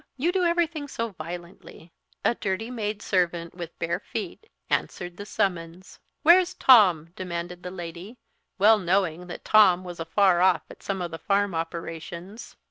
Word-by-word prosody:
You 320 +7 +1
do 370 0 0
everything 335 -3 0
so 230 -4 -3
violently." 170 -1 -10 0.3
A - - +4
dirty 225 +2 -3
maid 210 -3 -4
servant, 175 -3 0
with 170 -2 -8
bare 165 - -2
feet, 440 - -7 0.2
answered 175 -1 -2
the 205 +2 -9
summons. 180 -3 -3 0.2
"Where's 360 +3 +5
Tom?" 185 - +6
demanded 175 -1 -5
the 180 - -6
lady, 180 +5 -8 0.4
well 215 +2 +6
knowing 180 -2 0
that 175 - -9
Tom 185 -4 +5
was 175 -2 -8
afar 175 +2 +3
off 180 -4 +3
at - - -14
some 195 -2 -3
of 170 - -5
the 165 - -7
farm 200 -1 +1
operations. 165 +4 -6
185 Hz, 155 wpm, -26 LUFS, 170-215 Hz, 0.4 s, Tom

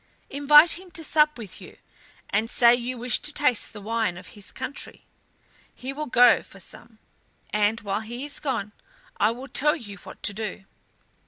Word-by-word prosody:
Invite 295 +4 +6
him 375 -1 -14
to 330 -3 -3
sup 300 -1 +2
with 210 -6 -9
you, - - -13 0.5
and 215 +3 0
say 235 -1 +5
you 245 +1 -2
wish 245 +1 0
to 300 - 0
taste 290 -6 +1
the 210 - -10
wine 220 -3 -2
of 185 - -11
his 205 -2 -12
country. 260 +2 -7 0.7
He 265 +2 -6
will 300 +2 -5
go 245 -1 +5
for 195 - -15
some, 225 +4 -10 0.5
and 210 +2 +1
while 200 +1 -2
he 240 +5 -6
is 290 0 -5
gone 230 -8 -3 0.5
I 210 - +3
will 250 +4 -6
tell 295 +4 +3
you 205 -9 -9
what - - -13
to 205 - +3
do." 210 -2 -6
240 Hz, 180 wpm, -25 LUFS, 210-285 Hz, 0.7 s, Invite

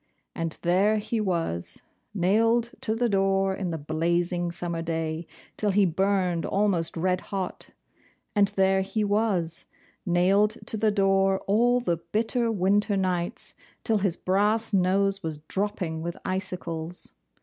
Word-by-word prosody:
And 165 -1 -3
there 195 +5 +3
he 220 +1 -2
was, 165 - -2 0.3
nailed 225 +5 +2
to 220 -4 0
the 240 +1 +1
door 195 -2 +2
in 190 -2 -3
the 165 - -2
blazing 170 +3 0
summer 170 -1 -4
day, 160 0 -3 0.3
till 210 - +1
he 200 +1 +4
burned 185 -1 +1
almost 195 -5 0
red 180 +2 +1
hot; 190 -2 -5 0.7
and 205 -1 +5
there 190 0 +2
he 205 +3 -1
was, 200 -6 0 0.4
nailed 195 +4 +3
to - - +1
the 215 0 +2
door 195 -1 +2
all 240 +5 +3
the 175 -8 0
bitter 225 +7 -1
winter 205 +1 +2
nights, 180 -2 -2 0.3
till 220 -3 +1
his 190 -4 0
brass 210 +4 +1
nose 195 +1 +2
was 160 -2 -4
dropping 190 -5 -2
with 170 +1 -4
icicles. 180 -3 -4
190 Hz, 140 wpm, -26 LUFS, 175-210 Hz, 0.7 s, and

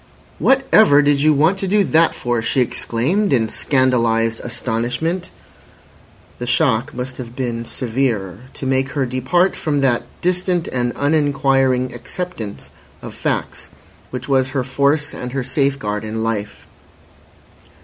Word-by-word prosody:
"Whatever 220 - +5
did 145 -1 +2
you 155 +1 +5
want 160 +7 +3
to 195 - -2
do 205 +2 +3
that 165 -2 +3
for?" 120 -2 -1
she 120 - 0
exclaimed, 125 - 0
in 115 -5 +2
scandalised 115 -4 +1
astonishment. 125 +8 -3 1.1
The 120 - -4
shock 125 -1 +1
must 125 +1 -5
have 120 -2 -8
been 120 -3 -3
severe 115 -7 -2 0.2
to - - -6
make 135 +1 0
her 140 -3 0
depart 130 +9 +1
from 145 -3 -1
that 125 -3 +2 0.2
distant 180 -1 0
and 120 -1 -1
uninquiring 135 -3 +1
acceptance 175 - -6 0.3
of - - -7
facts - - -3 0.4
which 125 0 -6
was 130 -2 +2
her 130 - +1
force 140 +3 0
and 125 0 -6
her 135 -2 -1
safeguard 135 -6 -1
in 110 +1 -3
life. 105 -2 -3
130 Hz, 135 wpm, -19 LUFS, 120-150 Hz, 1.1 s, Whatever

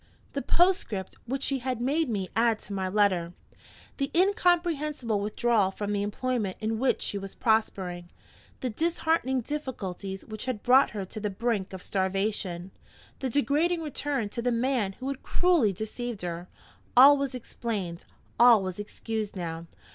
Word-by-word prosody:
The 280 - -1
postscript 335 - +1
which 270 +3 -2
she 275 -1 +1
had 255 -1 -2
made 280 +4 +1
me 195 -4 -2
add 230 -1 +3
to 205 - -7
my 190 -1 -1
letter; 185 -4 +2 0.6
the 275 -1 -1
incomprehensible 330 - +2
withdrawal 215 0 +2
from 205 +1 -4
the 205 -1 0
employment 210 -1 -2
in 220 0 -1
which 260 +1 +1
she 200 - -2
was 195 0 -8
prospering; 190 -6 0 0.5
the 255 - -1
disheartening 320 -2 +1
difficulties 200 -9 -5
which 215 +1 -6
had 250 -5 -3
brought 260 +3 +6
her 200 -3 -4
to 215 - -8
the 210 0 -2
brink 205 -1 -1
of 190 -1 -8
starvation; 190 -2 -1 0.5
the 265 - -2
degrading 310 +6 +1
return 285 -5 -2
to 235 - -4
the 245 +1 +1
man 235 -4 +1
who 255 - -7
had 275 -1 -3
cruelly 345 - +3
deceived 220 +2 -5
her 175 0 -4 0.5
all 275 +3 +10
was 275 -2 -2
explained, 210 -8 -4 0.4
all 235 -4 +7
was 185 0 -4
excused 215 0 -4
now! 165 -2 -5
225 Hz, 155 wpm, -28 LUFS, 195-270 Hz, 0.6 s, all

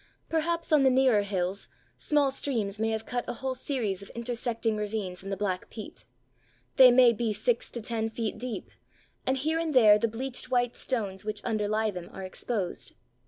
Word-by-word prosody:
Perhaps 330 +1 -1
on 305 -2 +6
the 265 - +5
nearer 255 -4 +4
hills 195 -1 -2 0.3
small 290 -3 +2
streams 225 -7 -1
may 220 0 +1
have 220 0 -2
cut 245 -1 -2
a 245 - -2
whole 260 +2 -3
series 235 -7 -2
of 200 - -10
intersecting 235 -1 -1
ravines 205 -4 -3
in 195 - -7
the 195 - -2
black 185 -3 -2
peat. 205 - -9 0.7
They 260 -1 +10
may 245 -1 +6
be 230 0 -1
six 230 +3 0
to 235 - -6
ten 225 0 -2
feet 225 -1 -3
deep, 245 -1 -5 0.6
and 260 +1 +2
here 315 +5 0
and 320 -3 -2
there 210 -4 +7
the 230 - +2
bleached 250 +3 -4
white 245 -1 +1
stones 200 -7 -3
which 210 0 -3
underlie 215 0 0
them 180 -2 -8
are 190 - -7
exposed. 190 0 -4
225 Hz, 185 wpm, -28 LUFS, 205-255 Hz, 0.7 s, They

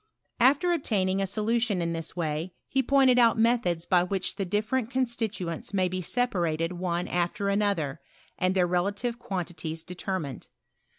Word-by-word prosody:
After 280 +9 +4
obtaining 195 - +1
a 195 - 0
solution 220 0 +1
in 170 -1 -1
this 165 0 -5
way 165 +1 -3
he 265 - +1
pointed 265 -1 +4
out 235 -1 +5
methods 220 -8 +2
by 180 0 +4
which 185 +1 -2
the 195 - -1
different 215 +5 0
con 260 0 +1
stituents 205 -7 -3
may 185 -1 +3
be 185 +1 -3
separated 175 -8 0
one 175 -1 -2
after 180 +3 -1
another, 200 -9 0 0.3
and 185 +1 0
their 180 -2 +4
relative 200 +7 -1
quantities 175 -6 -4
determined. 180 -5 -5
190 Hz, 155 wpm, -27 LUFS, 175-230 Hz, 0.3 s, out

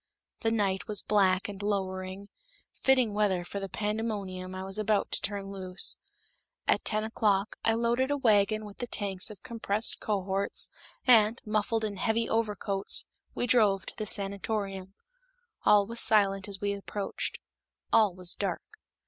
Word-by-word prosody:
That 225 -1 0
night 195 -4 0
was 210 -1 -1
black 190 -3 +3
and 200 -1 -7
lowering, 190 -1 -3 0.4
fitting 255 -5 +2
weather 195 -4 +1
for 200 - -4
the 195 -1 -5
pandemonium 205 -4 -3
I 185 - -5
was 195 +2 -3
about 215 -1 +1
to - - +2
turn 200 -1 -3
loose. 185 -1 0 0.7
At - - +2
ten 215 0 0
o'clock, 210 -2 0
I 225 - +3
loaded 235 +3 +1
a 290 - +1
wagon 215 -3 +3
with 205 -1 -11
the 245 - -3
tanks 195 -4 -2
of 210 - -12
compressed 225 -3 -1
cohorts, 195 -2 0 0.4
and, 225 -2 +5
muffled 220 +1 0
in 205 -2 -4
heavy 225 +3 +1
overcoats, 205 -3 0 0.3
we - - 0
drove 215 -5 +3
to - - -3
the 215 - -4
sanatorium. 195 -1 -2 0.7
All 205 -1 +6
was 230 +3 -2
silent 195 -2 +4
as 200 -2 0
we 200 0 -1
approached; 200 0 -4 0.6
all 210 -5 +5
was 180 -1 -1
dark. 195 -4 -2
205 Hz, 155 wpm, -29 LUFS, 195-220 Hz, 0.7 s, All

